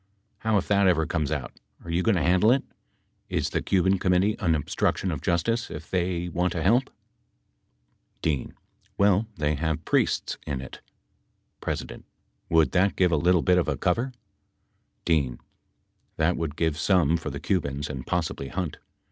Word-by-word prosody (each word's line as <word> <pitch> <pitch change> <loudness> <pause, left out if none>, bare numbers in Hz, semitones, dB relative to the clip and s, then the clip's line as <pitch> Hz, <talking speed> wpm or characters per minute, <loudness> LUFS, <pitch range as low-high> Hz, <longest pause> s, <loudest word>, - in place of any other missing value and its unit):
How 110 -1 +1
if 95 - -1
that 100 -1 +3
ever 80 -3 +3
comes 75 -3 -1
out, - - -4 0.3
are 85 - -5
you 85 +2 +1
going 110 +2 +2
to 85 - +1
handle 95 +6 +4
it? 135 +1 +2 0.7
Is - - -1
the - - 0
Cuban 95 0 +2
Com 90 0 +2
mittee 100 +4 +2
an 85 -3 +3
obstruction 85 +4 -1
of 75 -4 -4
justice, 115 +7 0
if - - -9
they 90 -1 -1
want 90 +1 -1
to 80 - -2
help? 120 +7 +3 1.3
D. 75 -5 -1 0.5
Well 100 +2 +3
they 75 0 +1
have 80 +1 -2
priests - - 0
in 70 -3 -2
it. 65 - -9 0.8
P. - - 0 0.8
Would 80 -1 +4
that 95 +2 +2
give 90 -2 +3
a - - +3
little 85 +3 +3
bit 90 0 +4
of 85 - 0
a 75 -3 -1
cover? 115 - 0 0.9
D. 70 -7 +1 0.8
That 80 +3 +2
would 80 -3 -3
give 80 -2 0
some 85 -3 +3
for 85 - -3
the - - -6
Cubans 70 -6 -1
and 65 -3 -6
possibly 85 -6 -2
Hunt. 90 0 -4
85 Hz, 170 wpm, -26 LUFS, 80-95 Hz, 1.3 s, handle